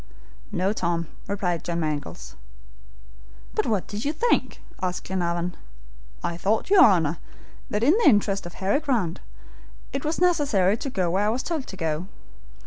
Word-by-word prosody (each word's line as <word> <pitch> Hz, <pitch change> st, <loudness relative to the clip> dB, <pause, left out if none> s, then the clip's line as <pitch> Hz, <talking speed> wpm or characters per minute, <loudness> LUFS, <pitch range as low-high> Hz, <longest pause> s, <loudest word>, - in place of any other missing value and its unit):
"No, 190 Hz, +3 st, +1 dB
Tom," 170 Hz, -5 st, -1 dB, 0.2 s
replied 180 Hz, -4 st, -1 dB
John 170 Hz, -1 st, -2 dB
Mangles. 145 Hz, -, -4 dB, 1.2 s
"But -, -, 0 dB
what 210 Hz, -5 st, +1 dB
did 210 Hz, +1 st, -5 dB
you 290 Hz, -, +1 dB
think?" 470 Hz, +10 st, +1 dB, 0.2 s
asked 180 Hz, -1 st, -2 dB
Glenarvan. 175 Hz, -1 st, -1 dB, 0.7 s
"I 170 Hz, -, -2 dB
thought, 215 Hz, -, 0 dB
your 395 Hz, -2 st, +9 dB
Honor, 165 Hz, -6 st, +4 dB, 0.5 s
that 210 Hz, +2 st, -1 dB
in 300 Hz, +9 st, +5 dB
the 340 Hz, -, +7 dB
interest 200 Hz, -5 st, +2 dB
of 175 Hz, -, -11 dB
Harry 195 Hz, +8 st, +1 dB
Grant, 240 Hz, -, 0 dB, 0.7 s
it 275 Hz, -, -2 dB
was 310 Hz, +2 st, -1 dB
necessary 285 Hz, -, +3 dB
to 275 Hz, -, -4 dB
go 185 Hz, -8 st, 0 dB
where 200 Hz, +3 st, +2 dB
I -, -, +3 dB
was 245 Hz, +4 st, -1 dB
told 320 Hz, -6 st, -3 dB
to 190 Hz, -, -8 dB
go. 165 Hz, 0 st, -2 dB
195 Hz, 160 wpm, -25 LUFS, 170-255 Hz, 1.2 s, your